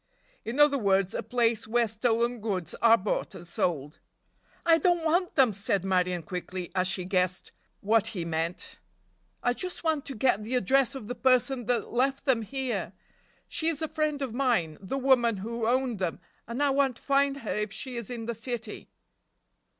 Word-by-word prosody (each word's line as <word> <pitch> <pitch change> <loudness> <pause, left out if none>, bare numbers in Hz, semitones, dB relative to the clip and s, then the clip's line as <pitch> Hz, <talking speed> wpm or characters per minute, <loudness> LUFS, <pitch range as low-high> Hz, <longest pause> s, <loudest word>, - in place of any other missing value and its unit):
In 235 +5 -4
other 295 -1 +5
words 195 -3 +2
a - - -2
place 230 0 0
where 235 +1 +2
stolen 235 +2 0
goods 195 -6 -2
are 230 0 +7
bought 195 0 -2
and 175 -1 -10
sold. 155 -4 -2 0.7
"I 330 -1 +5
don't 345 -2 +2
want 350 +2 +1
them," 260 -7 +4
said 200 -1 -1
Marion 180 -2 +1
quickly, 180 +1 -5
as 185 -1 +1
she 185 -1 0
guessed 185 -1 0 0.3
what 215 +1 +3
he 180 -6 -4
meant, 165 +1 -3 0.6
"I 245 - +2
just 365 +7 -3
want 315 -3 0
to 275 - -5
get 220 -2 +2
the 235 +4 -2
address 265 +3 +3
of 265 - -6
the 245 - -4
person 255 -1 +2
that 245 -1 -1
left 270 +3 +1
them 260 -5 +3
here. 220 -5 -3 0.5
She 320 - -2
is 325 -3 0
a 320 - -2
friend 300 -2 -1
of 250 -4 -4
mine, 230 - 0
the 200 +8 -3
woman 250 -5 +3
who 225 +3 -3
owned 250 -3 +1
them, 180 -3 -2 0.3
and 235 +5 -2
I 285 - +3
want 270 -2 +2
to - - -17
find 275 0 +2
her 230 - -4
if 210 -1 -2
she 250 +4 -5
is 235 -4 -3
in 235 -2 -5
the 235 - -2
city." 230 -1 -5
235 Hz, 190 wpm, -28 LUFS, 195-270 Hz, 0.7 s, are